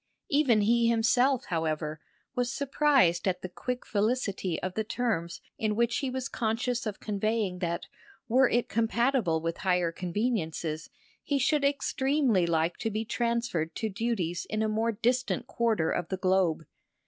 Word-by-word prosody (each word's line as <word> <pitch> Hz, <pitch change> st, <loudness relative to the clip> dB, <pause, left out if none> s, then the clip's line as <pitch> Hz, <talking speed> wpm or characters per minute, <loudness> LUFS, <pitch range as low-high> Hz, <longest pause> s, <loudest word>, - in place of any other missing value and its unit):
Even 275 Hz, -7 st, +4 dB
he 230 Hz, +3 st, +3 dB
himself, 245 Hz, +3 st, +3 dB
however, 155 Hz, -2 st, -2 dB, 0.3 s
was 245 Hz, -2 st, 0 dB
surprised 275 Hz, -, +2 dB
at 180 Hz, -1 st, -1 dB
the -, -, -2 dB
quick 250 Hz, +7 st, -4 dB
felicity 200 Hz, -5 st, -1 dB
of 185 Hz, 0 st, -2 dB
the 220 Hz, -, -1 dB
terms 215 Hz, -7 st, -2 dB, 0.2 s
in 215 Hz, -1 st, 0 dB
which 235 Hz, +1 st, +1 dB
he 275 Hz, -, -1 dB
was 255 Hz, 0 st, -3 dB
conscious 235 Hz, +2 st, -1 dB
of 210 Hz, -, -4 dB
conveying 210 Hz, -2 st, -1 dB
that, 170 Hz, -2 st, -2 dB, 0.4 s
were 250 Hz, +2 st, +4 dB
it 240 Hz, 0 st, +1 dB
compatible 230 Hz, -6 st, +1 dB
with 165 Hz, +1 st, -2 dB
higher 180 Hz, -3 st, +1 dB
conveniences, 170 Hz, -2 st, -2 dB, 0.3 s
he 285 Hz, -, 0 dB
should 280 Hz, +2 st, +2 dB
extremely 275 Hz, -, +2 dB
like 165 Hz, +1 st, +1 dB
to 225 Hz, -, -2 dB
be 220 Hz, +1 st, -2 dB
transferred 235 Hz, -9 st, -1 dB
to 220 Hz, -, -2 dB
duties 190 Hz, -5 st, -2 dB
in 215 Hz, 0 st, 0 dB
a -, -, +1 dB
more 220 Hz, +2 st, +1 dB
distant 245 Hz, +2 st, 0 dB
quarter 225 Hz, -9 st, 0 dB
of 175 Hz, -, -2 dB
the 190 Hz, -, -2 dB
globe. 185 Hz, -4 st, +2 dB
220 Hz, 155 wpm, -29 LUFS, 180-245 Hz, 0.4 s, Even